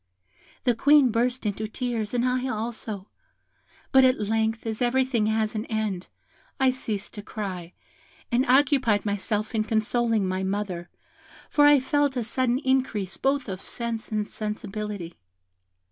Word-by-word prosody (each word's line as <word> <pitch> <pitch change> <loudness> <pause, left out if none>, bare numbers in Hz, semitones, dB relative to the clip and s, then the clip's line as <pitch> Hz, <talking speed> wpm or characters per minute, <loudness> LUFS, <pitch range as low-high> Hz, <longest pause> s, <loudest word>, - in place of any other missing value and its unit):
The 245 - +3
Queen 280 +1 +5
burst 245 +2 0
into 210 +1 -2
tears, 230 -1 -3
and 240 0 +2
I 255 +1 0
also; 220 -3 -4 0.8
but 265 -1 +7
at 255 -1 +4
length, 220 +2 0
as 220 0 -3
everything 245 -2 +2
has 220 0 0
an 215 0 -3
end, 215 -5 -2 0.5
I 265 -1 +4
ceased 220 -6 -4
to 205 - -7
cry, 185 -5 -6 0.6
and 240 +2 +3
occupied 260 -5 +3
myself 210 +2 -1
in 220 -1 +1
consoling 220 -1 +1
my 185 0 -1
mother, 190 -3 -3 0.6
for 290 -1 +6
I 290 -1 +7
felt 285 0 +1
a 245 - 0
sudden 245 +2 0
increase 255 -8 0
both 275 -1 0
of 190 -1 -6
sense 235 -2 -4
and 215 -1 0
sensibility. 210 -4 -4
220 Hz, 145 wpm, -26 LUFS, 210-255 Hz, 0.8 s, but